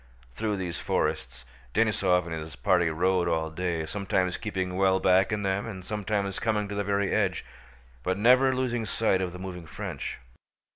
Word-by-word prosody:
Through 105 - -1
these 90 -3 -4
forests 65 0 -2 0.3
Denísov 95 -5 +3
and 85 - -5
his 80 0 -6
party 85 0 +2
rode 90 +2 +1
all 80 -1 0
day, 85 -1 -2
sometimes 95 +1 0
keeping 95 -4 -3
well 95 0 +3
back 95 0 +4
in 105 -1 -1
them 95 +2 0
and 95 -4 -7
sometimes 105 -2 -2
coming 105 -2 0
to - - -4
the 100 0 -1
very 100 0 0
edge, - - 0 0.6
but 95 +7 -1
never 130 +4 +5
losing 120 -3 -1
sight 105 -3 +1
of 90 -1 -2
the 90 - -8
moving 90 -3 -7
French. 75 - -5
95 Hz, 175 wpm, -28 LUFS, 90-105 Hz, 0.6 s, never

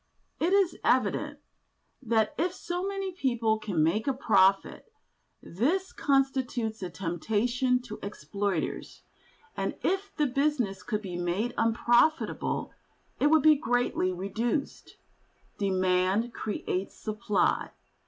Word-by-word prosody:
It 345 - +1
is 390 -4 +2
evident 265 +5 +1 0.6
that 225 -3 +1
if 350 +3 -1
so 350 0 -4
many 390 -1 -3
people 240 -10 0
can 195 -8 0
make 210 - +1
a 270 - +1
profit, 195 - +2 0.5
this 330 - -1
constitutes 260 -5 0
a 185 - -3
temptation 220 +9 0
to 215 -4 -8
exploiters, 200 -3 -3 0.5
and - - -2
if 390 +2 0
the 300 - +2
business 260 -8 0
could 215 -2 -3
be 180 -3 -5
made 175 +7 -1
unprofitable, 240 +7 +1 0.5
it - - +4
would 310 -1 +4
be 310 -1 +7
greatly 245 -7 0
reduced. 225 - -3 0.6
Demand 190 +3 +1
creates 195 -2 -3
supply. 215 -1 0
235 Hz, 115 wpm, -28 LUFS, 200-285 Hz, 0.6 s, be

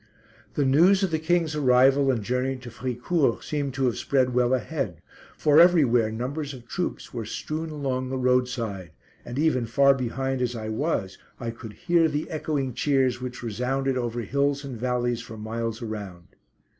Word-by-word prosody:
The 145 - +2
news 175 +9 +5
of 190 - 0
the 160 - 0
King's 160 -1 +1
arrival 135 0 +4
and 120 -5 0
journey 125 +4 -1
to 125 -2 -10
Fricourt 125 +3 -1
seemed 140 -3 -3
to 135 0 +1
have 120 - 0
spread 130 -2 +1
well 125 0 +2
ahead, 130 - -2 0.4
for 150 0 +5
everywhere 135 -11 +5
numbers 140 +5 -4
of 120 -2 -13
troops 180 - -4
were 120 -2 -3
strewn 155 +9 -4
along 130 -4 -2
the 130 - -2
roadside, 125 -8 0 0.3
and 120 - -7
even 140 -6 +1
far 140 +4 +5
behind 135 +1 -2
as 125 -1 -1
I 110 -1 -5
was, 110 - -2 0.2
I 115 -2 -3
could 115 -2 -10
hear 170 +1 +2
the 150 0 -3
echoing 145 -4 -2
cheers 130 -1 +1
which 125 -1 -6
resounded 130 +4 -1
over 120 -1 -2
hills 140 +5 0
and 135 -3 -6
valleys 120 0 -1
for 110 -2 -10
miles 115 +1 -4
around. 100 -6 -7
130 Hz, 170 wpm, -25 LUFS, 120-145 Hz, 0.4 s, news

